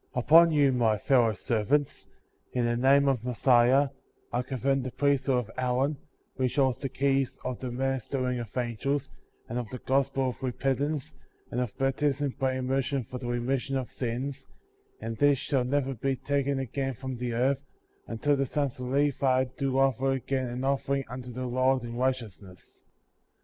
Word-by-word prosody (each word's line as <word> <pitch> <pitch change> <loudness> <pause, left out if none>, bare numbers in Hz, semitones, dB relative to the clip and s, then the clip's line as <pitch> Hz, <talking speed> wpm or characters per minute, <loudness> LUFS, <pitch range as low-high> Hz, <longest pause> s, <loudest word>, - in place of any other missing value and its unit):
Upon 165 +7 +6
you 145 -3 +4
my 115 -4 +2
fellow 115 -1 +3
servants, 120 +9 0 0.5
in 125 -1 +1
the 120 0 +1
name 135 +3 +4
of 130 -4 +1
Messiah, 125 +2 +4 0.4
I 120 - +1
confer 130 +1 -1
the 130 -1 -2
Priesthood 140 -2 +1
of 115 -3 -3
Aaron, 130 +4 +1 0.4
which 130 -2 0
holds 130 -4 +2
the 135 - -3
heys 135 -1 +1
of 125 -2 -3
the 130 - -4
ministering 130 0 -1
of 115 +1 -7
angels, 130 +4 -1 0.4
and 120 +2 -3
of 120 -3 -5
the 130 - -6
Gospel 135 0 +1
of 125 - -8
repentance, 135 +4 -1 0.4
and 125 - -1
of 120 -5 -4
baptism 135 +1 0
by 130 -1 +1
immer 130 +1 0
sion 135 0 -2
for 125 +3 -7
the 125 - -6
remission 130 +3 -1
of 130 -2 -4
sins; 130 +3 -4 0.5
and 115 +1 -5
this 145 -1 +4
shall 130 0 0
never 135 +1 0
be 135 +3 -1
taken 140 +1 -1
again 135 0 -2
from 130 +1 -5
the 120 0 -3
earth, 130 +3 +1 0.5
until 145 +6 +1
the 135 -1 0
sons 140 -3 -2
of 125 - -4
Levi 135 -1 +2
do 135 -1 -1
offer 135 0 +2
again 130 0 -2
an 125 +2 -4
offering 140 0 0
unto 125 0 -7
the 130 +1 -4
Lord 130 +1 +2
in 120 0 -6
right 130 +1 +2
eousness, 100 -6 -13
70. - - -38
130 Hz, 175 wpm, -28 LUFS, 125-135 Hz, 0.5 s, Upon